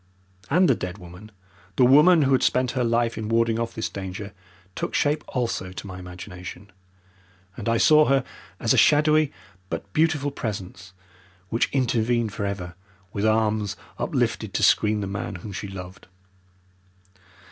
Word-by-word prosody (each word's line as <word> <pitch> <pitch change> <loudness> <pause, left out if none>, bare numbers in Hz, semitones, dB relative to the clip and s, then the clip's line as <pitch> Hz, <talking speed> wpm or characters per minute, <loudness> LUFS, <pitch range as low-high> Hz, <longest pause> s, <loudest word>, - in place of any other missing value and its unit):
And 180 +5 +4
the 135 - +5
dead 90 -4 -5
woman, 90 +3 -12 0.5
the 125 - +5
woman 150 +5 +6
who 135 - +1
had 130 - +4
spent 125 0 +2
her 130 -2 -1
life 115 -1 0
in 110 -1 -4
warding 115 0 +2
off 115 0 -3
this 110 - -2
danger, 100 +1 -7 0.4
took - - -4
shape 150 +1 +1
also 115 -7 -2
to 95 - -8
my 95 -2 -8
imagination, 90 +2 -9 0.8
and 115 -1 -4
I 115 - +2
saw 155 +5 +6
her 135 -2 +2 0.4
as - - +2
a - - +2
shadowy 150 0 +4 0.4
but 100 - -6
beautiful 155 -3 +1
presence 95 -7 -6 0.6
which 115 - +1
intervened 120 -4 +1
for 100 - -2
ever 90 -3 -5 0.4
with 105 +1 0
arms 110 -2 +1 0.2
uplifted - - -1
to - - +1
screen 105 0 +3
the - - -2
man 100 +1 -4
whom 100 +3 -8
she 100 +1 -5
loved. 95 -1 -9
110 Hz, 160 wpm, -24 LUFS, 95-130 Hz, 0.8 s, woman